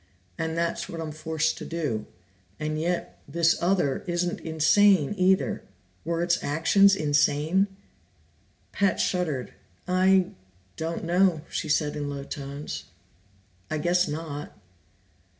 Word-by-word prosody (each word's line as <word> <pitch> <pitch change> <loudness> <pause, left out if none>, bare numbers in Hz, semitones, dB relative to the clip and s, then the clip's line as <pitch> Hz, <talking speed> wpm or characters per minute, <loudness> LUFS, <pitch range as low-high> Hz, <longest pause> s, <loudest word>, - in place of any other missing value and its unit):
And 160 - -3
that's 170 0 -1
what 165 - -6
I'm 160 -1 -4
forced 160 +1 -1
to - - -6
do. 150 -11 -3 0.5
And 155 0 -2
yet 175 +1 -2
this 170 0 +2
other 175 -6 +1
isn't 175 0 -1
insane 160 +2 +4
either. 190 0 +2 0.4
Were 170 +1 -1
its 175 0 +1
actions 195 +7 +4
insane?" 150 +4 +2 1.0
Pat 200 -3 +1
shuddered. 160 -9 -1 0.3
"I 185 0 +3 0.4
don't 165 +1 -3
know," 175 -1 +3
she 155 - -3
said 150 0 +1
in 145 -1 -3
low 140 -1 -5
tones. 140 - -6 0.8
"I 155 - -1
guess 175 +3 +2
not." 150 -1 -6
165 Hz, 120 wpm, -26 LUFS, 150-180 Hz, 1.0 s, insane